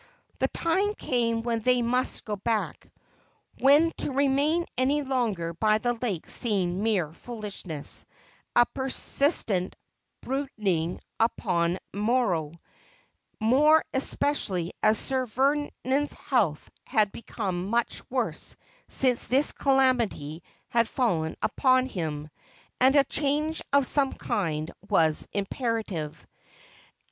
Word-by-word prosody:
The - - +2
time 390 +5 0
came 230 - 0
when 230 -1 0
they 250 +1 +3
must 250 +2 0
go 210 - -2
back, 215 +2 -2 0.7
when 295 +5 +5
to - - -2
remain 285 +5 +2
any 280 +3 +2
longer 225 -11 -1
by 215 +5 +2
the 240 +2 0
lake 225 -8 -3
seemed 190 -6 0
mere 195 -8 0
foolishness, 195 -8 -6 0.5
a 240 - +7
persistent 265 - +1 0.5
brood 270 +1 -2
ing 175 -5 0 0.2
upon 175 -6 +1 0.2
sorrow; 205 -8 +1 0.9
more 290 +8 +4
especially 215 - 0
as 215 0 +4
Sir 260 +2 -1
Vernon's 280 +2 0
health 200 - 0 0.2
had 210 -3 +2
become 190 -6 -4
much 235 +3 0
worse - - -2 0.3
since 255 -3 0
this 275 +3 +3
calamity 245 - +1 0.3
had 230 -1 +2
fallen 165 -11 0
upon 255 -1 +3
him, 155 - -4 0.5
and 260 +2 +5
a 280 - +7
change 300 +3 0
of 280 -1 +4
some 275 +1 +2
kind 160 -4 -2 0.2
was 160 -6 +2
imperative. 200 - -3
235 Hz, 110 wpm, -27 LUFS, 190-270 Hz, 0.9 s, a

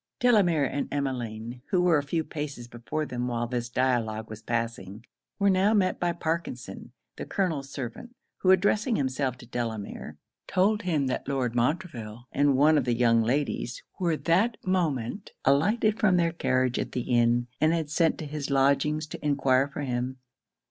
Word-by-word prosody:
Delamere 195 - +4
and 140 +2 -3
Emmeline, 120 -4 -3
who 185 - +2
were 175 -4 +4
a - - -1
few 160 +3 -1
paces 145 -6 -6
before 120 +6 -4
them 125 -2 -3
while 120 -1 -1
this 120 0 -3
dialogue 115 -4 0
was 110 0 -8
passing, 115 -3 -4 0.3
were 200 - +2
now 195 +4 +3
met 185 -3 +1
by 175 0 +1
Parkinson, 165 -6 -4 0.3
the - - -5
colonel's 160 -8 -1
servant, 140 - -7 0.2
who 185 - +1
addressing 205 +5 +3
himself 130 - -1
to 125 - -13
Delamere, 110 -10 -5 0.3
told 205 +4 +2
him 160 -8 0
that 130 - -2
Lord 130 -4 -1
Montreville 120 - -2
and 140 -1 +3
one 150 +2 +5
of 130 - -2
the 120 -2 +1
young 115 -1 +4
ladies 140 - -1 0.2
were 170 -4 +1
that 195 +10 +2
moment 170 - -1
alighted 210 - +3
from 185 -4 +4
their 170 -1 +2
carriage 130 -5 +1
at - - -4
the 125 - -1
inn, 120 0 +2 0.2
and 155 - +4
had 160 -3 -1
sent 165 0 +2
to 155 - -6
his 145 -1 -5
lodgings 140 +3 +2
to 155 - -9
enquire 135 -2 +2
for 140 - -6
him. 125 -1 -2
140 Hz, 170 wpm, -27 LUFS, 120-170 Hz, 0.3 s, one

